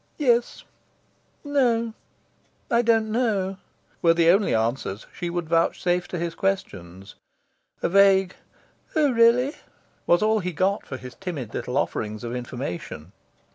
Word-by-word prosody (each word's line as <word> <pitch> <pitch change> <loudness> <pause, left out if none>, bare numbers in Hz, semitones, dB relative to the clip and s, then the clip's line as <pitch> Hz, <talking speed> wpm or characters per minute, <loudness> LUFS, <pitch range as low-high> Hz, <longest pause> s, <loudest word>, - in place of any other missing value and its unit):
"Yes," 240 -5 +1 0.8
"No," 240 -6 +1 0.8
"I 235 0 +4
don't 225 -2 +2
know," 205 -5 0 0.4
were 165 -1 +4
the 170 0 +5
only 195 - +2
answers 115 -2 -2
she 175 - -4
would 175 -1 -3
vouchsafe 175 +2 +1
to 180 - -5
his 170 0 -3
questions. 95 - -4 0.7
A - - +2
vague 195 0 +4 0.6
"Oh 300 -3 +3
really?" 240 +4 +4 0.5
was 175 +3 +4
all 220 0 +3
he 180 -2 -4
got 190 +5 0
for 130 - -5
his 125 -1 -10
timid 155 - -6
little 125 +2 -3
offerings 105 0 -2
of 120 +1 -4
information. 125 - -6
180 Hz, 135 wpm, -24 LUFS, 130-225 Hz, 0.8 s, the